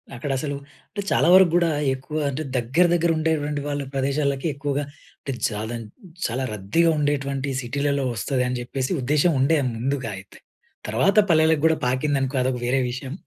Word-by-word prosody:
అక్కడ 135 +3 -4
అసలు, 145 0 -3 0.3
అంటే 205 - -4
చాలా - - +3
వరకు 185 -2 +7
కూడా 170 -1 +3 0.2
ఎక్కువ 140 +4 -6
అంటే 140 +3 -3
దగ్గర, 130 +9 +2
దగ్గర 170 -1 +2
ఉండేటటువంటి 150 -2 0
వాళ్ళ 145 0 -2
ప్రదేశాలకి 140 +1 0
ఎక్కువగా 140 +1 -2 0.4
అంటే 135 - -5 0.2
జాదన్ 110 +2 -5 0.4
చాలా 125 +3 -1
రద్దీగా 105 - +2
ఉండేటటువంటి 140 -1 -1
సిటీలలో 140 +2 -1
వస్తది 125 +4 -1
అని 125 - -2
చెప్పేసి, 130 +1 -3
ఉద్దేశ్యం 150 +6 +2
ఉండే 155 +4 +3 0.2
ముందుగా 130 -1 -2
అయితే. 95 - -13 0.5
తర్వాత 155 - +2
పల్లెలకి 160 -2 +4
కూడా 160 - +2
పాకిందనుకో 135 +1 0
అదొక 125 -1 -1
వేరే 130 +2 +2
విషయం. 130 +2 -6
140 Hz, 155 wpm, -23 LUFS, 130-150 Hz, 0.5 s, వరకు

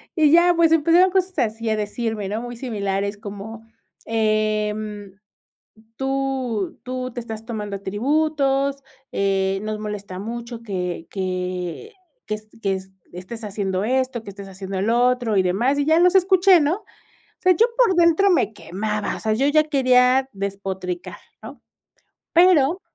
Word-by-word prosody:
Y 305 -3 +4
ya, 345 +1 +6
pues, 330 -1 +4
empezaron 335 +4 +4
cosas 375 0 0
así 225 0 -1
a 220 - +1
decirme 210 -1 -3
¿no? 215 +3 -3
Muy 240 0 -7
similares 200 -4 -2
como, 215 +2 -8 0.4
em: 215 -2 -1 0.8
"Tú 265 -6 -2
tú 255 0 -4
te 245 - -5
estás 225 -1 -8
tomando 210 -4 -5
atributos, 275 +5 0 0.3
eh, 195 -1 0
nos 215 0 -3
molesta 205 -3 -6
mucho 235 +2 -6
que 180 -5 -4
que 185 - -4 0.3
que 215 - -2
est 215 0 -14
que 195 -1 0
est 190 0 -9 0.2
estés 185 +6 -8
haciendo 195 -2 -2
esto, 255 -1 -1
que - - -9
estés 200 0 -10
haciendo 190 0 -5
lo 230 +4 +2
otro, 245 -5 0
y 190 - +4
demás", 235 +11 +1
y 285 - +1
ya, 315 +2 +4
los 360 +2 +4
escuché, 375 -1 +5
¿no? 295 +4 +2
O - - -24 0.4
sea, 370 - +5
yo 445 +7 +4
por 480 -6 +4
dentro 345 +3 +4
me 220 - +2
quemaba, 210 +2 -3
o - - -9
sea, 215 -1 0
yo 270 +5 +1
ya 305 +1 +4
quería 260 -2 +3
despotricar, 195 -2 -5 0.2
¿no? - - -10 0.7
Pero 345 -1 +5
225 Hz, 155 wpm, -22 LUFS, 200-275 Hz, 0.8 s, ya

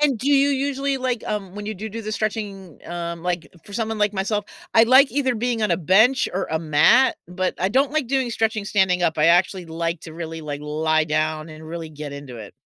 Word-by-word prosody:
And 280 -6 +2
do 270 +5 -2
you 280 0 +4
usually 275 0 0
like, 255 -3 -2
um, 195 -3 -4
when 205 0 -7
you 215 - -3
do 215 +4 -6
do 225 +2 -6
the 215 +1 -4
stretching, 200 -6 -4
um 170 -1 -5
like, 175 -4 -2 0.2
for 205 - -13
someone 220 0 -2
like 210 0 +2
myself, 205 +1 -1 0.3
I 225 0 +7
like 260 +3 +6
either 260 -3 +1
being 230 0 -1
on 210 - +1
a 170 - +3
bench 215 - +4
or 190 - -2
a 160 - 0
mat, 165 - +4
but 180 +2 -2
I 190 - +2
don't 270 +6 +2
like 305 -5 0
doing 260 -2 0
stretching 220 -2 -1
standing 190 -4 +2
up, 160 -2 +1
I 150 - +4
actually 175 +1 +3
like 165 0 -3
to 160 -1 -10
really, 165 -1 -6
like, 145 -1 -5
lie 155 +1 +1
down 155 +1 -1
and 155 0 -11
really 165 0 -6
get 150 -1 -7
into 140 -4 -9
it. 105 -3 -10
195 Hz, 230 wpm, -22 LUFS, 165-230 Hz, 0.3 s, I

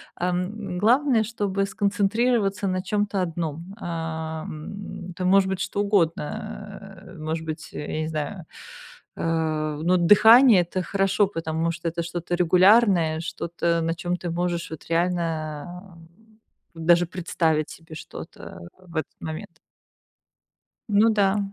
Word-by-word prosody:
ам. 180 +2 -3
Главное, 245 +2 +4
чтобы 205 -3 -1
сконцентрироваться 200 0 +1
на 185 0 0
чём-то 205 0 -1
одном. 170 +1 -4
Ам, 160 +2 -5
это 180 +1 -4
может 190 +1 +4
быть 190 -1 -2
что 200 - -2
угодно, 195 -7 +2 0.8
э, 185 -2 -13
может 160 +1 -3
быть, 160 0 -6
я 150 - -5
не 155 - -2
знаю, 160 +4 -4 0.7
э, 155 -2 -1
ну, 180 +2 +3
дыхание- 215 +5 +7
это 175 +2 -3
хорошо, 195 +1 +2
потому 165 -2 -2
что 165 0 -3
это 170 +1 -3
что-то 175 +1 -3
регулярное, 180 -2 +4
что-то, 170 +1 -5 0.2
на 165 0 0
чём 175 +1 -4
ты 175 - -5
можешь 175 0 -2
вот 160 - -8
реально 170 +1 -2 0.8
даже 170 +2 +3
представить 165 -3 0
себе 165 -1 -11
что-то 120 - -10 0.2
в 180 -3 -16
этот 155 - -3
момент. 160 0 -7 1.3
Ну 210 +2 +4
да. 205 -1 +2
175 Hz, 125 wpm, -24 LUFS, 165-195 Hz, 1.3 s, дыхание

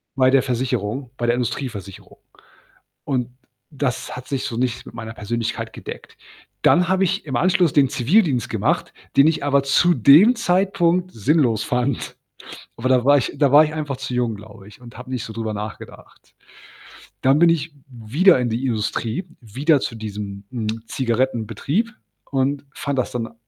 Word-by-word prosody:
bei 130 -1 +4
der 135 - +5
Versicherung, 125 0 -2
bei 120 - -2
der 120 0 +2
Industrieversicherung, 115 -6 -5 0.9
und 125 -4 -1 0.4
das 135 -3 -3
hat 130 0 -9
sich 135 -3 -2
so 115 - -4
nicht 125 0 -2
mit - - -11
meiner 110 -1 -7
Persönlichkeit 115 +1 -4
gedeckt. - - -10 0.5
Dann 180 0 +4
habe 190 0 +2
ich 190 0 -1
im 135 -5 -4
Anschluss 180 +2 +3
den 140 -2 +4
Zivildienst 140 - +2
gemacht, - - -1 0.2
den 140 +2 +6
ich 160 -2 0
aber 140 -1 +3
zu 155 +6 +3
dem 180 - +6
Zeitpunkt 185 -3 +1
sinnlos 120 - +1
fand. 125 +3 -2 0.6
Aber 130 +3 -1
da 125 -1 +3
war 145 +1 +6
ich 130 - -1
da 140 -3 +3
war 145 +2 +8
ich 155 0 -2
einfach 150 -4 -4
zu 130 -1 -6
jung, 120 -3 0
glaube 105 -1 -13
ich 110 - -16
und 120 -1 -13
habe 125 +1 -10
nicht 125 -3 -3
so 115 - -8
drüber 110 -1 -4
nachgedacht. 105 +1 -9 0.9
Dann 135 +3 +4
bin 170 0 +6
ich 160 -2 -1 0.2
wieder 130 - +3
in 125 -1 0
die 115 +4 -2
Industrie, 115 - -2 0.2
wieder 135 +7 +1
zu 115 - -4
diesem, 105 -2 -6
hm, 110 -2 -4
Zigarettenbetrieb 130 - -1 0.4
und 135 +1 0
fand 140 -2 -3
das 125 - -2
dann 115 -2 -4
130 Hz, 170 wpm, -21 LUFS, 115-150 Hz, 0.9 s, war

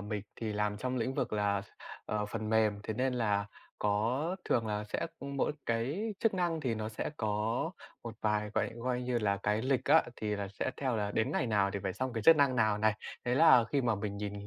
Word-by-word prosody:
mình 105 0 -4 0.2
thì 110 -2 -2
làm 105 0 0
trong 130 +3 -2
lĩnh 130 +3 -1
vực - - -1
là, 100 -1 +1 0.4
ờ, 105 -1 -1
phần 110 0 -4
mềm, 110 -2 +2
thế 110 - -3
nên 130 +2 0
là 105 -4 +1 0.3
có 120 - 0
thường 115 -1 +1
là 105 0 -2
sẽ 105 - -2
mỗi 140 +1 -1
cái 140 - -1
chức 225 -4 +2
năng 170 -3 0
thì 125 -5 0
nó 110 0 -3
sẽ 110 - -4
có 110 - -2 0.8
một 115 -1 -6
vài 105 -1 0
gọi - - +1
coi 125 +1 -2
như 125 -1 0
là, 100 -3 +1
cái 105 +2 +1
lịch 130 -1 +1
á, - - +6
thì 105 -1 -2
là 100 -1 -4
sẽ 100 +6 -3
theo 130 -4 -1
là 105 -1 -1
đến 110 +7 0
ngày 130 - +1
nào 100 -3 +2
thì 100 - -2
phải 95 -2 -1
xong 130 +3 -3
cái 115 - -3
chức 165 +8 +8
năng 140 -3 +3
nào 110 -2 +3
này. 110 0 +3 0.3
Thế 125 0 +1
là 135 -5 +7
khi 140 - +3
mà 115 -3 +2
mình 100 0 -4
nhìn 105 0 -4
110 Hz, 230 wpm, -32 LUFS, 105-130 Hz, 0.8 s, chức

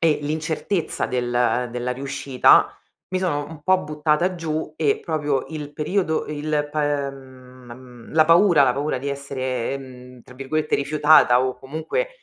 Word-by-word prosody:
e 160 -2 +3
l'incertezza 160 +4 -2
del 125 0 0
della 125 +1 -3
riuscita, 135 0 +2 0.3
mi 185 - -1
sono 145 -6 -1
un 160 -2 -11
po' 185 +2 +3
buttata 150 +4 0
giù 160 -2 -4
e 150 -4 +1
proprio 150 -5 -1
il 150 -2 -7
periodo 160 +2 -1
e 150 - -5
il 150 0 -1
pa 145 -2 0
ehm, 140 - -6 0.5
ma 120 - -9
mhmm, 125 -2 -14
la 155 0 +5
paura 170 -3 +5
la 125 - +2
paura 145 -1 -2
di 140 +2 -5
essere, 130 -3 -3
ehm, 125 -2 -11
tra 125 - -16
virgolette 150 +4 -2
"rifiutata" 145 -3 +4
o 130 -1 -2
comunque 160 - -3
145 Hz, 160 wpm, -22 LUFS, 130-155 Hz, 0.5 s, la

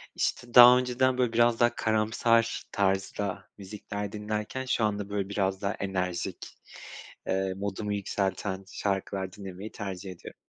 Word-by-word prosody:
işte 120 -1 -2
daha 125 0 +10
önceden 125 0 +1
böyle 125 -2 +1
biraz 120 0 +3
daha 120 0 +3
karamsar 115 +1 +1
tarzda 95 0 -1
müzikler 100 0 -6
dinlerken, 105 +4 -4
şu 125 -3 0
anda, 105 -1 -1
böyle, 100 -1 -2
biraz 95 -2 -1
daha 100 0 -1
enerjik, 90 -3 -3 0.8
eee, 95 0 0
modumu 100 +1 -3
yükselten 95 -1 -2
şarkılar 95 -1 -2
dinlemeyi 100 0 -8
tercih 95 -2 -6
ediyorum. 90 - -10
100 Hz, 130 wpm, -28 LUFS, 95-115 Hz, 0.8 s, daha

